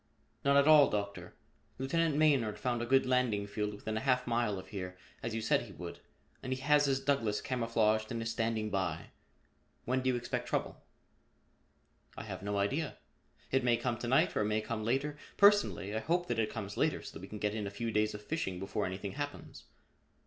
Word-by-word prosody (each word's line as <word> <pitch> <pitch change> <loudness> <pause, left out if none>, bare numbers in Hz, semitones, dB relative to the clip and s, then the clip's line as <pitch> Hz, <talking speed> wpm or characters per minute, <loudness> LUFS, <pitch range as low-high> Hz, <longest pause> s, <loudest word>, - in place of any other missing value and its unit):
"None 140 0 +4
at 140 +1 +5
all, 155 -2 +8
Doctor. 100 -1 -4 0.4
Lieutenant 155 +4 +1
Maynard 140 -8 +3
found 120 -2 -1
a 120 - -3
good 135 +1 +4
landing 125 -5 +1
field 105 +1 -2
within 110 +1 -4
a - - -2
half 125 -2 +2
mile 115 -4 0
of 95 - -9
here, 90 -3 -6 0.2
as 115 -1 -3
you 115 - -2
said - - +3
he - - -10
would, - - -8 0.4
and 130 - -5
he 130 - -1
has 145 +1 +4
his 135 -1 +2
Douglass 135 -7 +1
camouflaged 115 -2 +1
and 115 - -2
is 115 0 -2
standing 110 -2 -1
by. 90 -5 -2 0.7
When 130 +1 +1
do 130 - +1
you 125 - +2
expect 120 0 -3
trouble?" - - -2 1.4
"I - - -5
have - - -6
no 100 +1 -2
idea. 135 +10 -1 0.5
It 135 -1 +2
may 120 -1 +3
come 120 -2 -2
to 120 - -4
night 145 +9 +3
or - - +2
it - - +1
may 105 +1 +1
come 110 0 -4
later. 135 +6 -1 0.2
Personally 200 - +4
I - - +1
hope 175 +9 0
that 120 -1 0
it 110 - +1
comes 100 -3 -6
later - - +1
so - - -9
that - - -9
we - - -8
can 105 - -7
get 105 0 -1
in 105 -2 -3
a - - -3
few 115 +3 -3
days 105 0 +1
of 105 - -9
fishing 105 - -2
before 95 +2 -2
anything 95 +2 -5
happens." 145 +1 -6
115 Hz, 215 wpm, -33 LUFS, 105-135 Hz, 1.4 s, all